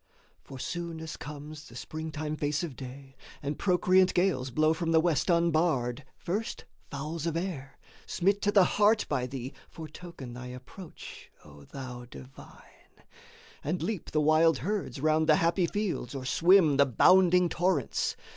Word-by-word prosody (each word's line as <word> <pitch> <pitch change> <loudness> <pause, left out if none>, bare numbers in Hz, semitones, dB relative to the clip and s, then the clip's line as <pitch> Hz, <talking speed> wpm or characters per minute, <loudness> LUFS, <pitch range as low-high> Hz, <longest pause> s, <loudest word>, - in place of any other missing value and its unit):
For 135 - -10
soon 170 +4 -5
as 160 -1 -6
comes 150 +1 -9
the - - -14
springtime 155 -1 -5
face 145 0 -1
of 155 -7 -5
day, 135 +1 -10 0.3
And 145 +1 -3
procreant 185 0 +3
gales 175 -8 +1
blow 155 +5 +2
from 165 0 -1
the 160 - +6
West 165 +1 +1
unbarred, 155 -6 +1
First 205 +6 -4 0.2
fowls 155 +3 -4
of 165 0 -1
air, 160 -7 -5 0.3
smit 200 +3 +1
to 205 - +2
the 200 -2 +6
heart 210 +4 +3
by 130 -4 -1
thee, 130 0 -6 0.2
Foretoken 155 -5 -9
thy 125 +1 -8
approach, 130 +8 -11 0.2
O 70 -1 -14
thou 125 - -8
Divine, 130 +2 -15 0.6
And 170 +5 -2
leap 210 -6 -3
the 155 - +1
wild 155 0 +4
herds 180 - -3
round 155 +2 +2
the 155 - +7
happy 170 +2 +2
fields 200 - -3
Or 130 -1 -5
swim 165 0 +4
the 140 0 +5
bounding 180 +6 +5
torrents. 180 +2 0
155 Hz, 155 wpm, -29 LUFS, 135-175 Hz, 0.6 s, the